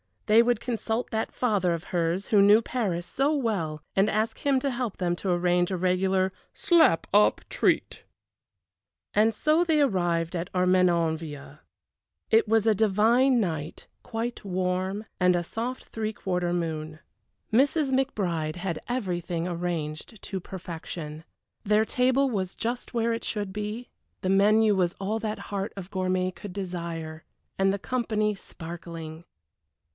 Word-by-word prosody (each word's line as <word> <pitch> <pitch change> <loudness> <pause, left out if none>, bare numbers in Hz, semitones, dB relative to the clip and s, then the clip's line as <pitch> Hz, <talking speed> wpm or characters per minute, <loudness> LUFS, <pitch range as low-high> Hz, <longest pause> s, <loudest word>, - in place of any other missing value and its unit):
They 220 +2 +6
would 235 -1 +1
consult 230 -1 -2
that 220 -1 -2
father 200 -8 +1
of 165 0 -4
hers, 175 +2 0
who 205 -2 +5
knew 205 +3 +7
Paris 200 -9 -2
so 280 +8 +1
well, 190 - -2
and 195 +2 +4
ask 220 +1 -1
him 280 -3 +2
to 275 - 0
help 240 -4 -3
them 175 -2 0
to 195 - -3
arrange 175 0 +2
a 190 - -1
regular 185 +1 +1 0.2
"slap 340 - +4
up 210 +1 +5
treat." - - 0 1.1
And 215 +1 +3
so 310 +8 +3
they 320 -3 +3
arrived 175 - +1
at 170 +1 -3
Armenonville. 165 -5 +1 0.7
It 225 0 +5
was 225 0 +3
a 220 - +5
divine 225 +5 +3
night, 160 -5 -4 0.2
quite 230 +1 -4
warm, 185 +2 -1 0.2
and 180 -1 +4
a 175 - 0
soft 235 +8 -5
three 220 -1 -3
quarter 180 -3 -1
moon. 155 -2 -3 0.5
Mrs. 275 +3 +3
McBride 180 - 0
had 175 -2 -3
everything 180 -8 -2
arranged 170 +2 -4
to 190 - -4
perfection. 165 -4 -7 0.4
Their 210 +1 +3
table 260 +4 +2
was 190 -6 -2
just 240 +2 -4
where 230 -1 +1
it 230 - -4
should 205 -3 -3
be, 210 +4 -5 0.3
the 185 - -1
menu 210 +2 +5
was 180 -2 +1
all 205 +3 -1
that 215 -1 -3
heart 195 +1 -2
of 195 -1 -8
gourmet 185 -1 0
could 190 0 -9
desire, 170 -4 -5 0.3
and 195 0 +4
the 200 - -1
company 215 -2 -1
sparkling. 165 -3 -9
195 Hz, 145 wpm, -27 LUFS, 175-225 Hz, 1.1 s, knew